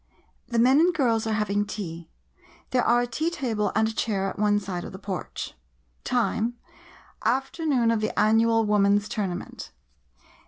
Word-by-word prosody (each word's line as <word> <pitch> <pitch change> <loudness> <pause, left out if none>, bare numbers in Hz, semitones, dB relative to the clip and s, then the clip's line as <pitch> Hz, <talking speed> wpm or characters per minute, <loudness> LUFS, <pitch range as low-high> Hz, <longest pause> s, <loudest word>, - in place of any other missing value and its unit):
The 235 - -2
men 255 +5 +5
and 345 +3 +5
girls 230 -6 +1
are 220 - 0
having 205 -1 0
tea. 170 -6 -6 0.6
There 250 -1 +2
are 240 +1 +4
a - - 0
tea 305 +7 -1
table 225 - -1
and 220 +1 +3
a 220 - -3
chair 205 -3 -1
at 195 - -6
one 205 0 +3
side 185 -3 -5
of - - -8
the - - -7
porch. 190 -1 -5 0.5
Time 240 -1 0 0.4
— - - -24
"Afternoon 270 -3 0
of 225 -2 0
the 215 - -2
Annual 225 +1 +3
Woman's 205 0 +3
Tournament. 200 -6 -5
220 Hz, 165 wpm, -25 LUFS, 205-240 Hz, 0.6 s, men